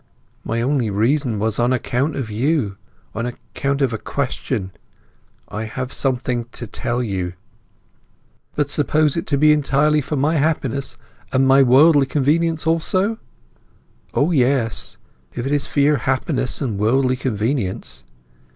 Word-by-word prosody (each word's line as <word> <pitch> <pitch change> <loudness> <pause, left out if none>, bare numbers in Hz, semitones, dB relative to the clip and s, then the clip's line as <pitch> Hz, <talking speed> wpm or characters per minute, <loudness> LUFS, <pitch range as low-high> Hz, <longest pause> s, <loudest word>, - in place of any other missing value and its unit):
"My 115 +1 -1
only 130 -4 +1
reason 115 +4 +1
was 110 +1 -1
on 120 +1 +2
account 130 +3 0
of 125 -6 -4
you—on 115 -3 -3
account 140 +3 -3
of 130 -3 +1
a 110 - -3
question. 130 -7 -3 0.8
I 110 +3 -5
have 130 +3 -5
something 125 -3 -1
to 120 - -5
tell 120 +2 -2
you—" 95 -5 -3 1.2
"But 145 -1 0
suppose 150 0 +2
it 165 - -3
to 140 - +1
be 150 +2 +5
entirely 150 +1 +2
for 150 - -4
my 150 +4 +1
happiness, 140 -3 -1 0.3
and 135 0 +3
my 135 +1 +6
worldly 135 +2 +5
convenience 155 +3 +1
also?" 185 +7 +1 1.0
"O 150 +5 +2
yes; 130 -5 0 0.4
if 120 - -3
it 135 - -2
is 145 - +1
for 145 - 0
your 145 +1 +4
happiness 130 0 -1
and 110 -7 -2
worldly 130 +4 +2
convenience. 110 - -3
135 Hz, 140 wpm, -20 LUFS, 115-145 Hz, 1.2 s, my